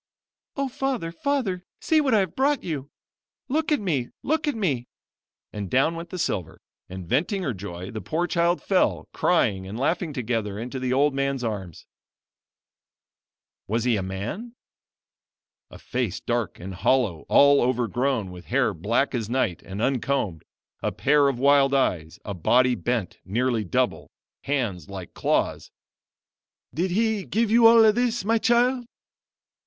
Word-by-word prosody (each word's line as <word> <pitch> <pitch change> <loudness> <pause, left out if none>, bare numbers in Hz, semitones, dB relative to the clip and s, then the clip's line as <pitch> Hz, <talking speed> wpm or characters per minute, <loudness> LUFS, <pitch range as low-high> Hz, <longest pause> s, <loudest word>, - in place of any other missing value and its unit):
"O 275 -1 -1
Father! 260 -9 -2
Father! 195 -3 -1 0.2
see 315 -1 +3
what 265 -6 +2
I 210 - +5
have 185 -4 -3
brought 280 +2 +1
you! 145 -5 -4 0.6
Look 310 +3 0
at 300 - +3
me! 150 -11 -1
Look 310 +2 0
at 290 - 0
me" 140 - -1 0.7
and 100 -3 -5
down 135 - +3
went 165 +1 -7
the 185 - -6
silver, 90 - -2 0.3
and 95 -1 -7
venting 180 - 0
her 130 - -1
joy, 95 -1 -7
the 110 - -5
poor 170 +3 -1
child 170 0 +1
fell; 190 -2 +1
crying 100 - +1
and 105 +4 -6
laughing 165 +4 0
together, 115 -6 -2
into 125 +4 -5
the 130 0 -2
old 140 +2 +3
man's 140 -1 -1
arms. 100 -7 -5 1.8
Was 115 +2 0
he 120 -2 +2
a 100 - -1
man? 105 - -5 1.1
A - - -12
face - - -3
dark - - -2
and 95 +2 -7
hollow, 100 -3 +1
all 140 0 +6
overgrown 120 -3 0
with 90 -1 -11
hair - - +1
black 115 - 0
as 115 -4 -2
night 120 -8 0
and 100 +3 -5
uncombed 125 - -1 0.4
a - - -1
pair 145 0 +3
of 135 -3 0
wild 140 +1 +4
eyes 85 -12 0
a 100 - -4
body 125 +8 +3
bent 120 -6 -2
nearly 115 +3 0
double 90 - -1 0.4
hands 115 -11 -2
like 95 -3 -8
claws. - - 0 1.0
"Did 175 +7 0
he 215 +2 +1
give 225 +2 0
you 230 0 +7
all 225 -2 +7
this, 240 -2 0
my 225 +1 +2
child?" 245 +1 +2
135 Hz, 155 wpm, -25 LUFS, -, 1.8 s, you